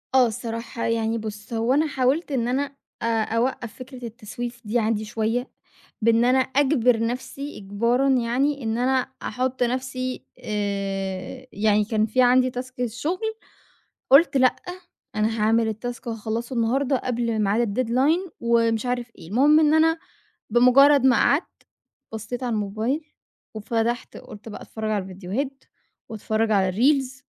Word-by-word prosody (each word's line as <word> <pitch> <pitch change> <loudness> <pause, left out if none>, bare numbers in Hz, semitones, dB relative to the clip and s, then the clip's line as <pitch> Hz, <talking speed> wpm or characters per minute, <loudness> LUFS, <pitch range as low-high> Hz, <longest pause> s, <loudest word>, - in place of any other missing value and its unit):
آه 255 -2 +6
الصراحة. 230 0 -5
يعني 230 0 0
بُص، 215 0 -7
هو 230 +3 +1
أنا 305 +3 +3
حاولت 280 +3 0
إن 240 -4 0
أنا 280 +3 -1 0.3
أ - - -2 0.2
أوقّف 230 0 -2
فكرة 255 -1 -9
التسويف 235 +1 -7
دي 220 +3 +1
عندي 220 -1 0
شوية، 225 +4 -2 0.5
بإن 230 +1 +4
أنا 255 +1 +4
أجبر 260 -3 +2
نفسي 260 +5 -4
إجبارًا 235 +7 +1
يعني 265 +2 +1
إن 225 +1 -1
أنا 260 +1 +1
أحُط 255 0 -1
نفسي 255 +1 -3 0.2
آآ 200 +2 -3
يعني 210 0 +2
كان 215 -1 +1
في 240 +4 +1
عندي 255 +1 +5
تاسك 255 +1 -7
الشغل، 250 +9 -2 0.9
قُلت 280 +1 +6
لأ 255 -1 +4 0.6
أنا 215 +1 0
هاعمل 225 +1 +3
التاسك 240 +3 -5
وهاخلّصه 225 +2 -4
النهارده 260 +4 +1
قبل 235 -3 -1
معاد 210 +2 +1
الdeadline 320 +8 +2
ومش 230 -1 +2
عارف 245 -1 -2
إيه. 160 - -13
المهم 285 +8 +5
إن 305 -1 +4
أنا 325 +1 +4 0.5
بمُجرّد 265 +4 +6
ما 255 - +6
قعدت، 290 +5 +1 0.5
بصّيت 230 +4 -5
على 245 -2 -1
الموبايل 220 +9 -2 0.5
وفتحت 230 +2 -2
قُلت 210 +1 -11
بقى 210 - -8
أتفرّج 220 -1 -5
على 205 -2 0
الفيديوهات 200 +9 -5 0.5
وأتفرّج 220 0 -1
على 195 -3 +3
الريلز 265 +5 +1
240 Hz, 140 wpm, -24 LUFS, 220-260 Hz, 0.9 s, آه